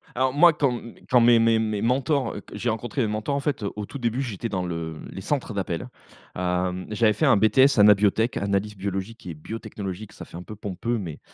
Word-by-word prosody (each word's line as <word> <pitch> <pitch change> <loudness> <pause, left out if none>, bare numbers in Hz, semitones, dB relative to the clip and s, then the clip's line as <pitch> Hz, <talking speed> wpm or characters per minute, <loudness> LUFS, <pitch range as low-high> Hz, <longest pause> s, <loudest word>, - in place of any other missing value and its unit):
Alors 130 +1 +1
moi, 165 +4 +6
quand 140 -3 +1
m 120 -1 -8 0.2
quand 125 -1 +6
mes 120 0 +6
mes 115 0 +4
mes 110 -2 -1
mentors, 130 +1 +1
q 105 - -6
j'ai 115 +3 -1
rencontré 120 +4 -2
mes 110 - 0
mentors 110 +6 -2
en 140 - -1
fait, 140 -5 -2
heu, 100 - -2
au 105 - -4
tout 140 - -8
début, 120 +2 -1
j'étais 115 -2 -4
dans 95 -3 -2
le 80 -2 -4
les 95 - -7
centres 130 +1 -2
d'appels. 90 -4 -3 0.5
Hem, 90 0 -1
j'avais 110 0 +3
fait 155 - 0
un 120 - +6
BTS 110 +5 +4
AnabioTech, 105 +3 +4
analyse 100 +1 -1
biologique 95 +3 -5
et 85 - -5
biotechnologique, 100 +2 -7
ça - - -10
fait - - -12
un 90 - -7
peu 110 - -9
pompeux 110 +4 -3
mais, 85 -7 -6
110 Hz, 220 wpm, -25 LUFS, 95-120 Hz, 0.5 s, moi